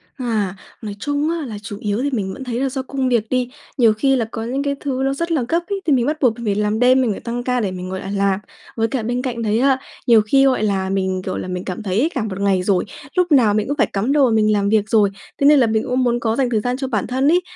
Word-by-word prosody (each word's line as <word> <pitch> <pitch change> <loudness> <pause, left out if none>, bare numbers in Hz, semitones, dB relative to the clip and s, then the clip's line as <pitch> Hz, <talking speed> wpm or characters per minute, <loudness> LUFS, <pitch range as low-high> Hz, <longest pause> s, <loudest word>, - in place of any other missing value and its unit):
À, 220 -7 -2 0.3
nói 205 -2 -6
chung 290 +4 -1
á 330 -3 -2
là 215 -3 -6
chủ 205 0 -6
yếu 210 +1 -1
thì 285 - +1
mình 195 -6 -2
vẫn 270 - -8
thấy 245 -1 -3
là 270 - 0
do 265 0 -3
công 260 -1 -2
việc 225 -3 +1
đi. 250 -1 0 0.3
Nhiều 230 -4 +5
khi 270 +5 +2
là 235 - 0
có 225 0 -6
những 265 +4 -2
cái 280 -1 -1
thứ 265 -2 -2
nó 270 - +1
rất 335 +4 -3
là 285 -7 +1
gấp 335 - +2
ấy, 400 -1 -3
thì 300 - +3
mình 245 -2 +2
bắt 305 +1 -1
buộc 245 -4 +3
mình 235 - -6
phải 200 -1 +1
làm 210 +1 0
đêm, 255 +1 +5
mình 235 -4 +1
phải - - -4
tăng 240 +1 -4
ca 250 -1 0
để 200 -4 -1
mình 185 0 -6
ngồi 190 0 -4
lại 195 - -6
làm. 200 -1 +1 0.4
Với 225 0 +1
cả 235 -1 -3
bên 245 +2 -1
cạnh 245 -3 -3
đấy 220 0 +1
á, 265 0 +3 0.3
nhiều 230 -2 +7
khi, 270 +6 +3
gọi 255 -5 +2
là, 195 -2 0
mình, 190 -1 -1
kiểu 185 - -3
là, - - -5
mình 180 0 -4
cảm 185 +3 -5
thấy 195 +1 0
ấy 310 +6 +2
cả 245 - 0
một 200 -2 -5
ngày 195 -2 +2
rồi, 185 -1 +2 0.3
lúc 360 -2 +2
nào 235 -7 +5
mình 215 +2 0
cũng 285 - -2
phải - - +3
cắm 210 +7 0
đầu 290 -2 +4
mà 240 - +2
mình 215 -1 +3
làm 200 -1 +1
việc 215 -1 +2
rồi, 210 -3 +4 0.3
thế 280 - +2
nên 295 -1 +7
là 240 - +4
mình 220 0 +1
cũng 255 +1 +1
muốn 240 -1 +1
có 225 -1 0
dành 260 -2 +1
thời 220 -3 +1
gian 245 +3 -2
cho 265 -1 -3
bản 215 -6 -1
thân 260 +3 0
ấy. 355 - +4
235 Hz, 315 wpm, -20 LUFS, 210-265 Hz, 0.4 s, nhiều